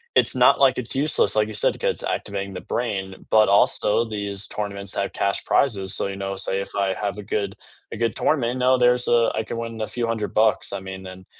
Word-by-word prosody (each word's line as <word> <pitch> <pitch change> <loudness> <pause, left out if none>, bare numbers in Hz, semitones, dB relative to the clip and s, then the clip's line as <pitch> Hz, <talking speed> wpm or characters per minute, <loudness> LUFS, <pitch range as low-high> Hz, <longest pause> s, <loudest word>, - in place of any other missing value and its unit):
it's - - +3
not, - - +5
like, 130 -2 +4
it's 125 +1 -1
useless, 150 -3 +2
like 105 0 +2
you 110 - -7
said, - - +2
because - - -2
"activating 100 -1 -3
the - - -6
brain," 95 -5 -4
but 110 -2 +5
also 105 +2 +3
these 100 -2 -4
tournaments 100 -2 -5
have 100 -1 -2
cash 100 0 -1
prizes. 100 -7 +1
So, - - 0
you 100 - -5
know, 95 0 -4
say 95 0 -1
if - - -7
I 100 -1 +1
have 100 +1 -3
a 105 - -7
good 100 -1 -2 0.4
a - - -6
good 115 -1 0
tournament, 130 -4 0
now, 130 +1 +4
there's 125 0 +3
a 120 -1 +3
I - - 0
can 115 - -6
win 115 -1 -5
a 110 - -2
few 120 -1 -3
$100. 110 -1 +1
I - - -3
mean, 95 0 -8
and 95 0 -11
105 Hz, 225 wpm, -23 LUFS, 100-115 Hz, 0.4 s, not